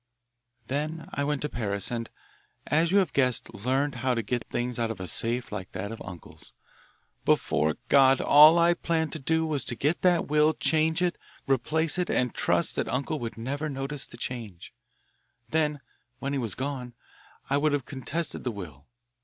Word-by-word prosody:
"Then 155 +5 -3
I 145 - -1
went 145 -1 -1
to - - 0
Paris 100 -5 -1
and, 115 -1 -3 0.6
as 165 +3 +2
you 200 - +4
have 190 -4 +2
guessed, 125 -5 +1
learned 130 +7 0
how 130 -1 +1
to 115 - -1
get 120 +1 -3
things 120 0 -2
out 115 -1 0
of 115 - -5
a 95 - -5
safe 120 +8 -1
like 95 -3 -6
that 95 +3 -4
of 115 - -8
uncle's. 90 -3 -11 0.7
Before 80 0 +2
God, 135 0 +6
all 155 +3 +8
I 170 0 +5
planned 160 -3 -1
to 155 - -3
do 160 +3 +1
was 150 -3 -1
to 120 - -3
get 150 +8 0
that 180 -2 +3
will, 150 +1 +3
change 160 +2 +2
it, 175 -1 0 0.3
replace 155 +6 +1
it, 180 - 0
and 125 -2 +1
trust - - +1
that - - 0
uncle 140 +4 -1
would 115 -3 -5
never 140 +6 -3
notice 135 +1 -3
the 120 - -11
change. 115 -8 -6 0.8
Then 150 0 0 0.4
when 140 +2 -3
he 140 - 0
was 115 -6 -1
gone, 130 -2 -4 0.5
I 140 - +2
would 150 +1 +2
have 145 -4 -1
contested 145 +5 -4
the 125 - -1
will. 80 - -9
135 Hz, 185 wpm, -27 LUFS, 115-155 Hz, 0.8 s, all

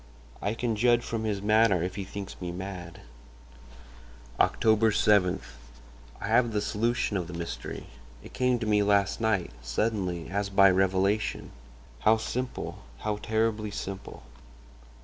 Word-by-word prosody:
I 105 +3 -1
can 115 -1 -1
judge 120 +2 +3
from 115 -1 -3
his 100 -2 -2
manner 105 -4 +4
if 90 +1 -3
he 100 - -4
thinks 100 +1 -7
me 90 -1 -3
mad. 90 -2 -7 1.4
"Oct. - - +2
7.—I - - 0
have 115 +1 +3
the 105 - +1
solution 105 +1 0
of 90 -3 -3
the 90 - -7
mystery; 85 0 -6 0.4
it - - -12
came 125 -1 +2
to 115 - -4
me 105 -1 +3
last 100 0 +2
night—suddenly, 90 - -1
as 100 0 -1
by 100 -1 +6
revelation. 95 +3 +1 0.5
How 110 - +4
simple—how 110 - -4
terribly 110 0 0
simple! 100 -1 -7
100 Hz, 130 wpm, -28 LUFS, 90-110 Hz, 1.4 s, by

